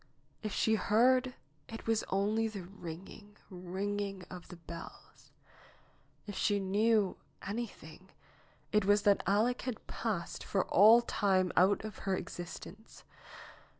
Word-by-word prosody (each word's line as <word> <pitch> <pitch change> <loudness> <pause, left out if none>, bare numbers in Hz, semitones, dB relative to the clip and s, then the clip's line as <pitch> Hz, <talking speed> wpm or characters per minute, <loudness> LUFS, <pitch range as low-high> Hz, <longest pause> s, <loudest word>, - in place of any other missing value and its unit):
If 215 - -3
she 220 - +2
heard, 250 +5 +3 0.3
it 225 - -8
was 225 -1 +1
only 210 +3 +1
the 205 -4 -6
ringing, 195 +3 -10
ringing 195 +2 -4
of 180 -2 -9
the - - -10
bells! 170 0 -11 1.0
If 205 - -7
she 205 +1 +1
knew 205 +1 +2 0.3
anything, 190 -5 -6 0.6
it 210 0 +3
was 205 +1 +3
that 200 -1 +4
Aleck 220 +5 +2
had 250 -3 -5
passed 205 -7 -3
for 195 - 0
all 220 +5 +7
time 190 -5 +1
out 195 +3 +4
of 215 - -7
her 195 -1 -1
existence. 175 +4 -9
205 Hz, 125 wpm, -32 LUFS, 185-220 Hz, 1.0 s, all